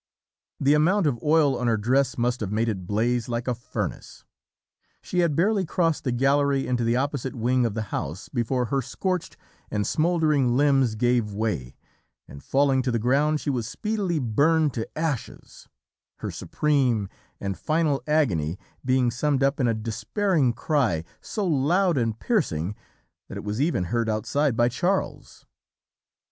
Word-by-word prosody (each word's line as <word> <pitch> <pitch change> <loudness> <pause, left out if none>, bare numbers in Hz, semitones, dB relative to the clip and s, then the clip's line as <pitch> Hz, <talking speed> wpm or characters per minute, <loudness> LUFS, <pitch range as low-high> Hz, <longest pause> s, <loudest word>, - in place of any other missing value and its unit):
The 140 +2 +4
amount 175 +6 +3
of 120 -6 0
oil 150 -2 +3
on 125 0 -2
her 115 -2 +2
dress 130 +5 +1
must 120 +1 0
have 100 -3 -3
made 110 +2 0
it 95 -5 -3
blaze 120 +3 0
like 120 +1 -3
a 125 - +1
furnace. 120 +1 -6 0.8
"She 180 - -2
had 170 -4 +2
barely 195 +4 +2
crossed 165 -2 0
the 125 - +1
gallery 135 +2 +2
into 125 -1 0
the 115 +1 +1
opposite 135 0 -2
wing 125 +1 +1
of 105 - -5
the 110 - -1
house 80 +9 -4
before 125 0 -1
her 135 - +2
scorched 185 - -3 0.3
and 105 0 -1
smouldering 155 -7 +2
limbs 135 -5 +3
gave 120 -2 +1
way, 100 - -3 0.5
and 70 - -12
falling 135 -1 +2
to 130 - -2
the 115 - +1
ground 140 +6 +2
she 145 - -1
was 120 -4 -2
speedily 205 - -2
burned 145 +4 +2
to 110 - -4
ashes; 155 -6 -4 0.5
her - - -5
supreme 130 -9 0 0.3
and 100 -1 -3
final 155 - 0
agony 95 - +1 0.3
being 130 -1 +2
summed 135 +2 0
up 140 +2 +1
in 125 - +2
a 115 - +1
despairing 130 - 0
cry, 115 - 0 0.2
so 210 - -3
loud 170 +4 +2
and 115 -2 -1
piercing 105 - 0 0.5
that - - -7
it - - -6
was 105 +4 -2
even 150 - +1
heard 115 +5 -1
outside 115 +5 0
by 120 - +4
Charles. 180 +10 -2
130 Hz, 160 wpm, -25 LUFS, 115-150 Hz, 0.8 s, The